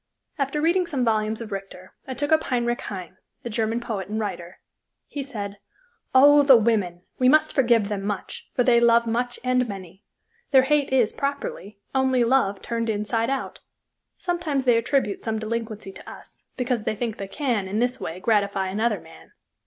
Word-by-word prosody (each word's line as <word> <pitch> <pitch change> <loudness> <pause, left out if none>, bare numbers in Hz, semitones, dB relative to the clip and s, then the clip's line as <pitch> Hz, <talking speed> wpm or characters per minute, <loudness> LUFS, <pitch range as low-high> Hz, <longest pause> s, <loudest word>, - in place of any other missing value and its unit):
After 275 +2 -1
reading 345 +3 +2
some 270 -7 -1
volumes 220 0 0
of 225 -2 -7
Richter, 195 -2 -8
I 260 - -4
took 290 +5 -2
up 315 0 +4
Heinrich 240 -2 0
Heine, 185 -2 -7 0.3
the 235 - -5
German 225 +1 0
poet 220 -6 -4
and 215 +2 -3
writer. 180 -4 -5 0.5
He 285 - -5
said: 205 -7 -6 0.6
"Oh, 290 +2 +8
the 275 -2 +7
women! 205 -6 0 0.2
We 255 0 +5
must 310 +2 +4
forgive 235 -6 +3
them 200 -2 -3
much, 205 -1 -5
for 245 - +3
they 235 -1 +5
love 235 0 +4
much 245 +2 -2
and 250 -1 +1
many. 190 0 -9 0.5
Their 265 -2 +6
hate 285 0 +1
is, 245 -5 +3
properly, 275 -7 -4 0.2
only 260 -2 +2
love 230 -5 +1
turned 230 -1 -2
inside 220 +2 0
out. 275 -1 -3 0.6
Sometimes 335 -7 -1
they 245 -2 +5
attribute 230 -4 0
some 220 -1 -2
delinquency 220 -2 -4
to - - -12
us, - - -13 0.2
because 250 -3 -1
they 215 - -1
think 225 0 -3
they 195 - -5
can, 230 -4 -1
in 200 +3 -3
this 245 +2 0
way, 165 +3 -5
gratify 200 -2 +1
another 220 +5 0
man. - - -16
230 Hz, 180 wpm, -24 LUFS, 205-260 Hz, 0.6 s, Oh